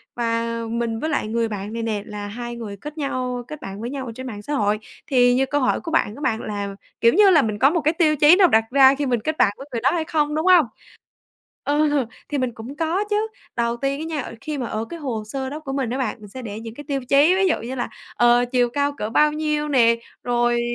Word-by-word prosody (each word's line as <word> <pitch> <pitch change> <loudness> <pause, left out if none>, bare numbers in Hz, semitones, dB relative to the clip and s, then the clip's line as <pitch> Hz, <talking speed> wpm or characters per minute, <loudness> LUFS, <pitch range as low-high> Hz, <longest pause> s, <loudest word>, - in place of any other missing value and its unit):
và 230 -1 0 0.3
mình 230 -1 -2
với 315 - -2
lại 290 - -1
người 230 +1 0
bạn 210 0 -5
này 230 - -3
nè 215 -3 -1
là 210 -2 -6
hai 240 +3 -6
người 215 -4 -7
kết 300 +9 -9
nhau, 255 -4 -2
kết 305 -1 -8
bạn 195 +2 -7
với 240 - -4
nhau 270 -1 -5
ở 235 - -6
trên 260 0 -7
mạng 210 -4 -7
xã 295 +8 -5
hội. 210 -4 +1 0.3
Thì 245 -3 +4
như 270 +1 +2
câu 290 +2 -1
hỏi 255 - +1
của 330 - -6
bạn 225 -9 +1
của 290 - -11
bạn, 225 -5 0
là, 200 -1 -4 0.3
kiểu 230 0 +5
như 405 +1 +6
là, 320 -5 +6
mình 215 -4 -2
có 270 - +6
một 335 +1 0
cái 310 +3 +2
tiêu 315 -3 +3
chí 300 +4 +7
nào 375 -1 +6
đặt 220 -7 +4
ra 270 0 +7
khi 290 - -2
mình 245 -3 +1
kết 315 0 -2
bạn 200 - +4
với 275 - -10
người 230 -2 -3
đó 265 - +4
hay 325 -2 -1
không, 300 -1 0
đúng 315 +3 -1
hông? 360 -6 +7 1.0
Ờ, 290 -3 +2 0.2
thì 290 - -2
mình 255 -2 -1
cũng 245 +6 -9
có 335 +5 0
chứ, 420 +1 +1 0.3
đầu 235 0 0
tiên 275 +3 -2
á 315 - -3
nha, 285 - 0
ờ, 230 - -8
khi 305 -2 -4
mà 250 - -2
ở 220 0 -3
cái 335 +8 -8
hồ 245 -7 -3
sơ 265 +3 -4
đó 300 +2 -6
của 275 -3 -6
mình 270 -4 -1
á 260 - -2
bạn, 255 -5 -1
mình 210 - -11
sẽ 255 +6 -8
để 215 -2 -6
những 225 0 -8
cái 290 +3 -9
tiêu 275 -1 -1
chí, 290 +6 +5
ví 385 0 +2
dụ - - +3
như 245 +3 -5
là, 245 - -3 0.3
ờ, 240 0 +5
chiều 245 -1 +3
cao 285 +2 0
cỡ 210 - -4
bao 300 +5 +4
nhiêu 300 -1 -1
nè, 235 -4 +4 0.3
rồi 240 -1 +1
255 Hz, 275 wpm, -22 LUFS, 230-295 Hz, 1.0 s, chí